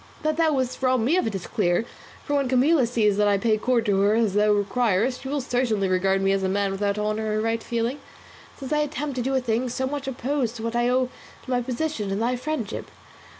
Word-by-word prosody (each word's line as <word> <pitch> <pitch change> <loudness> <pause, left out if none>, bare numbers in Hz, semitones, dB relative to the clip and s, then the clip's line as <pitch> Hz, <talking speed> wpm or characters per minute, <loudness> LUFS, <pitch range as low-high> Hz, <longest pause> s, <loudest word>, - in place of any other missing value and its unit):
That 310 0 +1
thou 320 -2 +3
wouldst 260 -2 -2
rob 255 -1 +3
me 265 +10 +2
of 370 - +1
it 215 - -3
is 185 - -5
clear, 190 0 0 0.4
for 290 - -1
when 275 -3 +1
Camilla 260 +1 +3
sees 215 -4 +2
that 210 0 +3
I 200 -1 +3
pay 215 +2 +2
court 240 0 +1
to 200 -2 +2
her 205 +2 +3
as 225 -4 +2
thou 210 +1 +3
requirest, 215 +3 +1
she - - -7
will 285 +1 -1
certainly 245 -6 0
regard 190 +1 +1
me 195 - +3
as 195 0 +1
a 190 - 0
man 200 0 0
without 200 +1 -1
honour 215 0 -1
or - - +1
right 225 +1 0
feeling, 235 +5 -2 0.6
since 275 +1 -4
I 300 - +2
attempt 295 -2 -2
and 245 - -2
do 270 0 0
a - - +3
thing 245 0 -1
so 260 +2 -2
much 280 0 -4
opposed 260 -2 -2
to 225 - -7
what 230 +1 -3
I 240 0 +2
owe 255 0 +1 0.3
to - - -13
my 250 - +2
own 245 - -2
position 255 -5 -2
and 195 +1 -1
thy 240 +3 +1
friendship. 255 -3 -4
235 Hz, 250 wpm, -24 LUFS, 210-260 Hz, 0.6 s, thou